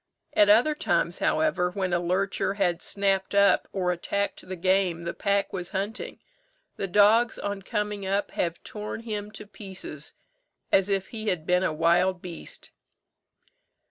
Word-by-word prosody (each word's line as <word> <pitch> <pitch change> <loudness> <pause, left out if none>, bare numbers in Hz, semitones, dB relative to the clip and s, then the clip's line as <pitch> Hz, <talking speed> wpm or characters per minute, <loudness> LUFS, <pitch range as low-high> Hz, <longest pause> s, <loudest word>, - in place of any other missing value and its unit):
At 205 -1 +5
other 240 +9 +6
times, 300 - 0
however, 300 - +2
when 185 -1 -2
a 175 - +3
lurcher 190 +3 0
had 180 -4 +1
snapped 195 -1 0
up, 200 0 +4
or 180 -2 0
attacked 200 +3 -2
the 185 - -3
game 185 -1 +1
the 170 - -3
pack 200 -1 0
was 180 -2 -4
hunting, 205 +5 -4 0.6
the 195 - -3
dogs 210 +5 +4
on 200 -1 -3
coming 210 +1 -2
up 195 +1 -1
have 170 -1 -2
torn 210 +1 -6
him 210 -3 -4
to 210 - -8
pieces, 190 -7 -7 0.6
as 195 +1 +4
if 195 -1 0
he 220 -1 -6
had 175 -6 0
been 180 +1 +3
a 185 - +1
wild 175 +4 +2
beast." 175 -2 -7
195 Hz, 155 wpm, -27 LUFS, 180-205 Hz, 0.6 s, other